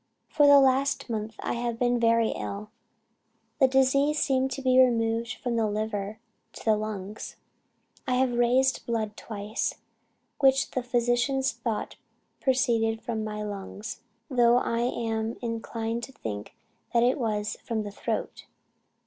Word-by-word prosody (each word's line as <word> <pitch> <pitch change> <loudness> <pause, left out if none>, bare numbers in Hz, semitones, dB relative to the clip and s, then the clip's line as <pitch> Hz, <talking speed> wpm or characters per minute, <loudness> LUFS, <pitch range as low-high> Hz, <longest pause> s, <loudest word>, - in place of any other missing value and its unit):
"For 295 -2 +4
the 285 0 +9
last 270 -1 +2
month 220 0 -3
I - - -1
have 235 -1 -2
been 245 0 +2
very 230 -1 +3
ill. 205 +1 -5 0.9
The 265 - +6
disease 275 +3 +3
seemed 265 -1 +2
to 275 - -5
be 255 0 +6
removed 230 -1 +1
from 240 -2 -2
the 225 -1 +2
liver 210 0 -3 0.4
to - - -11
the 220 -1 +4
lungs. 210 -1 -5 0.7
I 255 - +2
have 255 -1 +2
raised 250 +2 +2
blood 220 -3 -1
twice, 210 +1 -3 0.6
which 270 0 +4
the 255 - -1
physicians 245 +2 +1
thought 225 -3 -4 0.4
proceeded 230 -4 +2
from 225 -2 -2
the 210 0 -4
lungs, 205 +1 -6 0.3
though 240 -2 +4
I 230 -2 0
am 225 -2 -1
inclined 230 0 -3
to - - -15
think 105 - -6 0.4
it 245 +3 +3
was 210 -3 -1
from 225 -2 -2
the 205 - -6
throat. - - -4
235 Hz, 140 wpm, -27 LUFS, 220-255 Hz, 0.9 s, the